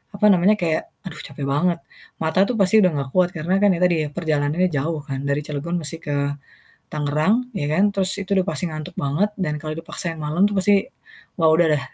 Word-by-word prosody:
apa 205 +1 +1
namanya, 190 +3 +4
kayak 165 -6 -1 0.2
aduh 180 -5 -8
capek 140 0 -8
banget. 165 +5 +1 0.4
Mata 160 +3 0
tuh 250 - -2
pasti 200 +1 +4
udah 185 -4 +4
ga 140 -1 -1
kuat 180 +2 +3
karena 175 +5 0
kan 200 -2 +4
tadi 170 -3 +1
perjalanannya 155 +2 0
jauh 150 +1 -2
kan 135 -3 -5
dari 140 +1 0
Cilegon 150 +3 -4
mesti 155 +2 -2
ke 145 -3 -4 0.8
Tangerang 150 +6 +1 0.2
ya 145 - -2
kan 190 +5 +3
terus 190 -2 +2
itu 195 - -12
udah 185 - +1
pasti 205 - -1
ngantuk 155 +3 -7
banget 150 +10 0
dan 165 -6 -2
kalau 155 0 -5
dipaksain 165 +1 -3
malem 155 +4 -1
tuh 205 - -4
pasti 200 +2 +4 0.6
wah 165 -2 +4
udah 170 +1 +4
deh 145 -2 +1
165 Hz, 200 wpm, -22 LUFS, 150-185 Hz, 0.8 s, namanya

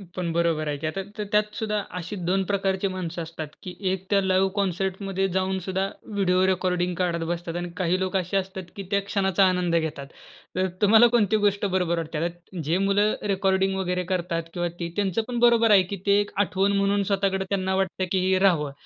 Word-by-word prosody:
पण 175 -2 -2
बरोबर 165 -2 +1
आहे 145 -1 -2
की 155 - -1
आता 195 +5 -3 0.2
त - - -3
त्यात 210 0 +2
सुद्धा 210 -1 -1 0.2
अशी 180 +4 -5
दोन 190 +1 +2
प्रकारची 195 0 0
माणसं 175 -2 -4
असतात 160 -1 -6 0.2
की 180 -2 -6 0.2
एक 190 0 -3
त्या 200 -1 +3
लाईव्ह 190 0 +2
कॉन्सर्टमध्ये 195 0 -1
जाऊन 190 0 0
सुद्धा 190 0 -1 0.3
व्हिडिओ 185 -2 +2
रेकॉर्डिंग 180 -1 0
काढत 170 -2 0
बसतात 170 -1 -4
आणि 175 0 -3
काही 185 0 +1
लोक 190 +1 -2
असे 185 +2 -1
असतात 190 0 -3
की 200 - -6
त्या 200 0 +2
क्षणाचा 195 -1 +2
आनंद 180 -2 +1
घेतात. 155 -4 -2 0.5
तर 185 0 +1
तुम्हाला 220 +3 +7
कोणती 220 -3 +2
गोष्ट 205 0 +1
बरोबर 180 -3 0
वाटते. 160 -1 -4
आता 175 +2 -5
जे 165 +5 +1
मुलं 200 +2 +2 0.2
रेकॉर्डिंग 190 0 +1
वगैरे 180 -1 -1
करतात 170 -2 -1
किंवा 175 -1 -1
ती 170 0 -3
त्यांचं 200 +1 0
पण 240 -1 -2
बरोबर 235 -2 +5
आहे 195 -2 +7
की 200 - -2
ते 200 0 +4
एक 205 - -5
आठवण 195 +2 +1
म्हणून 200 0 +2
स्वतःकडे 195 -1 +1
त्यांना 190 -1 0
वाटतं 190 -1 -1
की 190 - +2
हे 190 - +3
राहावं. 165 -7 +2
190 Hz, 200 wpm, -25 LUFS, 175-195 Hz, 0.5 s, तुम्हाला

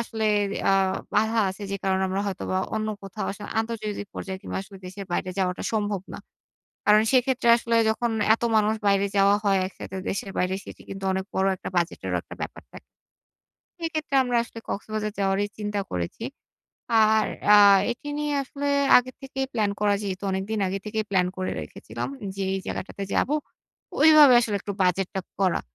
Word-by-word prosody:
আসলে 225 -1 -3 0.5
আ - - +4 0.4
বাধা 220 +2 +2
আছে, 190 +2 -7
যে 200 - -1
কারণে 190 0 +1
আমরা 190 +1 -1
হয়তো 195 -2 -4
বা 185 - +1 0.2
অন্য 215 0 -1
কোথাও 195 +2 -5
আসলে 205 +1 -9
আন্তর্জাতিক 215 -3 -4
পর্যায়ে 190 -1 -5
কিংবা - - -5
আসলে 195 0 -13
দেশের 195 +2 -7
বাইরে 185 - -1
যাওয়াটা 180 -1 -1
সম্ভব 205 -3 0
না। - - -6 0.7
কারণ 210 +1 +6
সেক্ষেত্রে 255 -1 +2
আসলে 230 0 0
যখন 230 +2 0 0.2
এত - - -8
মানুষ 215 0 +3
বাইরে 200 0 +3
যাওয়া 200 +1 +5
হয় 195 -1 +3
একসাথে 190 0 -8
দেশের 195 0 -3
বাইরে, 180 +1 +1
সেটি - - -11
কিন্তু 195 0 -7
অনেক 190 0 -2
বড় 190 0 +2
একটা - - -7
বাজেটেরও 170 0 -1
একটা - - -11
ব্যাপার - - -6
থাকে। - - -12 0.9
সেক্ষেত্রে 315 -3 -3
আমরা 245 -1 0
আসলে 235 - -10
কক্সবাজার 215 0 -3
যাওয়ারই 195 +1 +1
চিন্তা 205 -1 -2
করেছি। 90 - -4 0.8
আর 215 0 +4 0.3
আ - - +9 0.4
এটি 265 +5 -10
নিয়ে 295 0 -1
আসলে 280 +1 -5 0.3
আগে 250 +1 -3
থেকেই 270 0 -3
প্লান 215 -3 +1
করা 205 -1 +3
যেহেতু 195 0 -4
অনেকদিন 195 +3 -2
আগে 190 +1 -2
থেকেই 215 +1 -2
প্ল্যান 185 -2 +3
করে 185 0 -2
রেখেছিলাম 110 +10 -6 0.3
যে, 195 - -2
এই 195 - -2
জায়গাটাতে 195 +1 -5
যাবো, 295 - +2 0.7
ওইভাবে 305 -4 +8
আসলে 215 -4 -1
একটু 200 - -5
বাজেট 185 +1 +1
টা 190 - -1 0.2
করা। 185 -3 +2
205 Hz, 175 wpm, -25 LUFS, 190-225 Hz, 0.9 s, আ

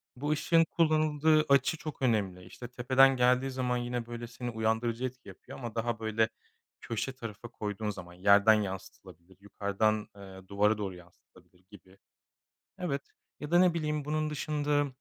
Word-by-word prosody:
bu 145 +4 -4
ışığın 165 +2 +3
kullanıldığı 155 -1 +3
açı 140 +3 +3
çok 155 -2 -8
önemli, 100 -7 0
işte, 120 - -9
tepeden 130 +2 +4
geldiği 125 +2 +3
zaman 125 -1 -1
yine, 120 -1 -3
böyle, 120 0 -7
seni 125 +1 -6
uyandırıcı 115 +2 -1
etki 130 -2 -7
yapıyor 95 - -12
ama 120 -4 -6
daha 115 0 -2
böyle 110 0 +1 0.5
köşe 115 +4 -3
tarafa 115 -2 -8
koyduğun 105 -1 -4
zaman 90 -4 -8
yerden 100 +4 +5
yansıtılabilir, 95 -3 -6
yukarıdan, 100 +1 -1
eee, 95 -1 -12
duvara 105 +2 +2
doğru 100 -3 -4
yansıtılabilir 90 +1 -20
gibi. 95 -1 -16 0.8
Evet. 140 -6 -3 0.3
Ya 150 +1 -7
da 175 - +6
ne 180 -1 +5
bileyim 150 -3 -2
bunun 155 +1 -1
dışında, 150 -1 0
120 Hz, 150 wpm, -30 LUFS, 100-140 Hz, 0.8 s, da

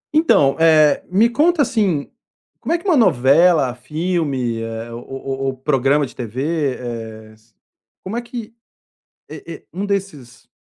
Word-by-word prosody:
Então, 145 - +4
eh, 155 -3 +4
me 200 +6 +4
conta, 305 +6 +2
assim, 200 - -1 0.5
como - - -4
é 340 - +3
que 340 - -16
uma 355 - +4
novela, 155 - +4
filme, 135 -4 -2
eh, 115 +1 -6
ou 120 - -8 0.2
ou 135 0 -3
ou 130 - -3
programa 135 +2 +1
de 125 - -13
TV, 135 +4 -2
eh, 110 -3 -7
s 110 0 -27 0.5
como 195 +4 -5
é 240 - -1
que 235 -2 -8 0.8
e - - -9
e - - -10
um 195 +2 -3
desses 185 -12 -5
145 Hz, 155 wpm, -19 LUFS, 125-195 Hz, 0.8 s, Então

